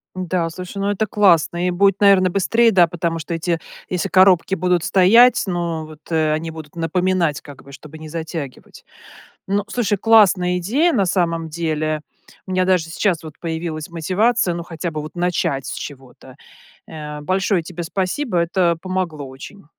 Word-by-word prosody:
Да, 180 -2 -2
слушай, 180 +4 -8
ну, 200 - -1
это 210 +2 -1
классно, 180 -3 +2
и - - +1
будет, 195 +2 +2
наверно, 195 -3 +5
быстрее, 230 +5 +2
да, 175 -3 +5
потому 165 0 -3
что 170 - -6
эти, 165 0 -1 0.3
если 180 -2 -2
коробки 190 0 +4
будут 180 -2 +1
стоять, 230 +8 +5
ну, 170 -3 -3
вот, 155 -1 -13
э, 155 -1 +1
они 160 +1 -2
будут 160 -1 -11
напоминать, 170 -1 0
как 145 -2 -13
бы, 140 - -15
чтобы 155 +3 -12
не 155 0 -9
затягивать. 160 -4 -7 0.6
Ну, 200 +1 0
слушай, 210 -5 -1
классная 195 -5 +4
идея 270 - +1
на 200 -4 +2
самом 170 -3 0
деле. 155 -1 -2 0.5
У 185 - -5
меня 185 0 +2
даже 185 -3 +2
сейчас 165 0 -1
вот 155 -2 -10
появилась 160 -2 -4
мотивация, 185 +4 +1
ну, 170 - -4
хотя 170 0 -5
бы, 155 -1 -5
вот 155 - -9
начать 170 -6 -1
с - - -4
чего-то, 130 -1 -10 0.5
э. 150 -1 -7
Большое 185 +2 0
тебе 175 0 -7
спасибо, 190 - -2
это 170 0 +1
помогло 180 -7 -3
очень. 135 +10 -12
175 Hz, 170 wpm, -20 LUFS, 160-185 Hz, 0.6 s, наверно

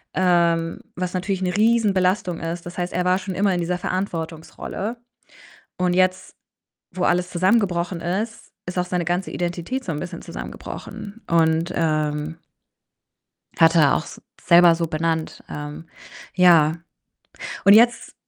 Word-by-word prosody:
ähm, 170 -2 +2
was 180 0 -3
natürlich 190 +1 -2
'ne 180 -1 -1
Riesenbelastung 200 -5 +2
ist. 170 +1 -5
Das 175 - -9
heißt, 175 0 -3
er 180 +1 -1
war 180 +1 +3
schon 190 -1 -6
immer 195 -1 +2
in 175 - -1
dieser 175 +1 -1
Verantwortungsrolle 180 +4 -4 0.8
und 180 -1 +2
jetzt, 185 0 +1 0.6
wo 185 - -3
alles 180 +1 +1
zusammengebrochen 180 -2 +1
ist, 205 +7 -4 0.2
ist 180 - -5
auch 180 - 0
seine 180 -1 -2
ganze 175 +2 -1
Identität 175 +9 -3
so 180 - -2
'n 150 - -4
bisschen 175 - -6
zusammengebrochen 210 +2 -8
und, 165 0 +2
ähm 155 -1 -1 1.2
hat 165 0 +6
er 150 -4 +5
auch - - -1
s - - -11 0.2
selber 170 -1 +6
so 165 0 -1
benannt. 160 0 -2
Ähm, 150 +3 -7 0.5
ja, 165 -4 +5 0.9
und 200 +1 +8
jetzt 235 +2 +4
175 Hz, 140 wpm, -22 LUFS, 165-185 Hz, 1.2 s, und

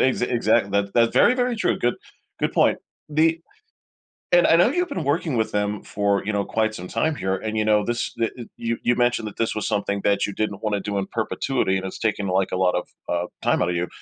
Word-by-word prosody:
Ex 130 -1 +2
exact 115 -4 +2
that's 100 0 0
that's 115 -1 +3
very, 250 - +5
very 245 -2 0
true, - - 0
good 120 - +1 0.5
good - - 0
point. - - +3 0.3
The 160 +2 +2 0.9
and 175 0 +5
I 165 - +5
know 175 - +5
you've 355 +6 -1
been 170 - -3
working 145 -3 0
with 110 -1 0
them 105 0 -1
for, 100 -1 0
you 105 - -1
know, 100 -1 0
quite 110 -1 0
some 90 - -7
time 160 0 0
here, 95 -8 -1
and 110 +3 -4
you 110 - +1
know, 105 -1 +3
this 120 +1 -2
the 115 -1 +1
uh 120 - -6
you 115 0 -2
you 120 - +2
mentioned 120 -2 +1
that - - -12
this 115 -1 -1
was 105 - -2
something 100 -1 -1
that 100 -1 +2
you 100 - -5
didn't 105 -1 -3
wanna 105 -2 0
do 100 0 -3
in 95 - -2
perpetuity 110 -2 -1
and 95 - -3
it's 95 - -7
taken, 105 -3 -1
like, 95 +1 0
a - - 0
lot 90 -1 +2
of, 90 - -2 0.2
uh, 85 0 -1 0.2
time - - +2
out 85 - +1
of 85 - -1
you. 90 0 -1
110 Hz, 250 wpm, -23 LUFS, 100-120 Hz, 0.9 s, very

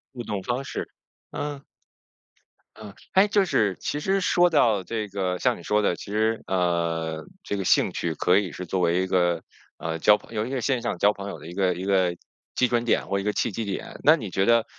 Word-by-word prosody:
互 120 - -5
动 105 -3 -3
方 125 +4 -2
式， - - -5 0.4
嗯。 145 -1 -5 1.1
嗯。 105 -2 -10 0.2
诶， 190 +2 +6
就 205 -1 +3
是 105 - +1
其 145 - -3
实 195 +5 +1
说 175 -1 +3
到 115 - +3
这 110 +1 -3
个 95 -2 -2
像 - - +1
你 85 - -12
说 105 +3 +2
的， 95 - +1
其 100 - -9
实， 110 +1 +1
呃， 85 -3 -1 0.2
这 100 - -3
个 100 - -2
兴 - - +3
趣 85 -2 -2
可 90 +4 +3
以 100 -4 0
是 90 - -7
作 95 +2 -2
为 85 +1 +2
一 95 - -1
个， 85 -2 +1 0.4
呃， 80 0 -3
交 105 +5 +6
朋 115 - -14
友 105 0 0
因 130 - -5
为 130 - -1
线 130 -1 0
上 - - -2
交 105 +4 +4
朋 100 0 -7
友 - - -7
的 - - -11
一 85 - -8
个 95 -1 +1
一 90 +2 -6
个 95 -3 +2 0.4
基 125 - +2
准 120 -1 +1
点 120 - +1
或 100 - 0
一 - - -4
个 105 - +1
契 - - 0
机 115 +4 -3
点， 100 -2 -5
那 155 - +7
你 110 -9 -6
觉 95 +1 +1
得 115 0 +4
100 Hz, 250 characters per minute, -25 LUFS, 90-120 Hz, 1.1 s, 那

